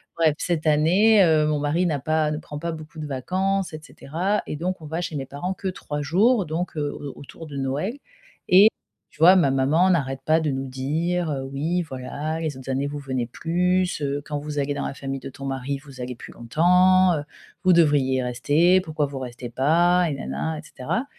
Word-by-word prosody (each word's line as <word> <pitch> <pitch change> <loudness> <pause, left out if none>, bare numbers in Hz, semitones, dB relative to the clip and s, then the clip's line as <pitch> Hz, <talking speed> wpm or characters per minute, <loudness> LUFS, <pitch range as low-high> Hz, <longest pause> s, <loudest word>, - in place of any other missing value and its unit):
Bref, 160 -3 +3
cette 165 -3 -1
année, 185 +8 +5
heu, 155 -2 +3
mon 150 -1 +1
mari 150 +5 +1
n'a 150 -4 -1
pas 155 +2 +1
ne 150 - -2
prend 150 -1 -8
pas 170 +2 -3
beaucoup 155 -1 -9
de 150 - -5
vacances 185 +7 -1
et 155 - -6
cetera 175 +7 -2
et - - -5
donc 180 +4 -3
on - - -9
va 160 +3 -3
chez 170 -2 -4
mes 135 -2 -3
parents 145 +8 -4
que 190 - -5
3 150 -5 -4
jours, 200 - +3
donc 165 +2 -4
heu, 145 -1 -1
au 145 -2 -7
autour 160 +3 -11
de 145 -2 -7
Noël 140 - -2 0.5
et 190 +4 +8 0.4
tu - - -24
vois 175 +4 +8
ma 170 -7 +4
maman 145 +7 +3
n'arrête 135 -6 0
pas 160 +1 +4
de 155 - 0
nous 135 0 -3
dire: 160 +7 -1
«Heu 135 -2 -3
oui 160 +6 -1
voilà, 150 +2 -5
les 155 -4 -3
autres 130 0 -10
années 135 +2 -1
vous 145 +1 -5
venez 130 -3 -2
plus, 180 +5 0
heu, 140 0 -1
quand 150 -1 -3
vous 150 0 -6
allez 145 +1 0
dans - - -3
la - - -5
famille 135 -1 -5
de - - -8
ton 140 - -9
mari, 135 +1 -3
vous 135 -2 -12
allez 125 0 -5
plus - - -11
longtemps. 180 +8 +4
Heu, 145 - -3 0.4
vous 185 -1 +5
devriez 140 -6 +3
rester, 145 +10 +3
pourquoi 155 -4 -2
vous 140 -1 -6
restez 125 -1 -7
pas?» 170 +8 +3
et - - -2
nin 135 - -7
nin, 160 -1 -3
et - - -7
cetera, 155 - -3
155 Hz, 220 wpm, -24 LUFS, 140-175 Hz, 0.5 s, et